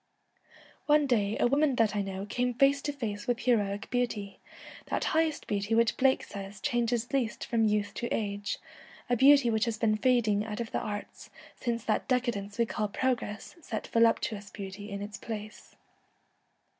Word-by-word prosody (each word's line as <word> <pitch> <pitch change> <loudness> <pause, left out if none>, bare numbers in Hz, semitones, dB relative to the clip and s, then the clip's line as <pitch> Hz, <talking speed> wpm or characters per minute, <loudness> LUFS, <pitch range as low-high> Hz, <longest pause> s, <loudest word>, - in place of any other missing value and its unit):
One 300 0 +5
day 220 -5 +1
a - - +3
woman 280 +2 +3
that 220 -3 +2
I 205 - +1
know 195 0 -4
came 245 +3 -1
face 275 +2 +4
to 290 - -2
face 215 -7 -5
with 245 -1 0
heroic 205 -4 +1
beauty, 230 -5 -2 0.5
that - - -1
highest 320 -1 +1
beauty 205 +2 -1
which 230 -1 +3
Blake 265 0 +3
says 195 0 -8
changes 240 +2 0
least 240 -6 -1
from 225 -2 +1
youth 210 -1 0
to 240 - -2
age, 205 -1 -2 0.5
a - - +5
beauty 270 -1 +6
which 220 0 +2
has 230 -2 -2
been 220 -1 +2
fading 215 -3 +2
out 215 0 -5
of 230 -1 -4
the - - 0
arts, 205 -1 -6 0.3
since 235 -2 -2
that 215 - 0
decadence 235 -6 -1
we 235 - +3
call 215 -1 -2
progress, 230 - -2
set 220 -8 -4
voluptuous 225 -3 +2
beauty 200 0 -8
in 200 0 -4
its 210 +1 -7
place. 215 -2 -8
225 Hz, 170 wpm, -29 LUFS, 205-245 Hz, 0.5 s, beauty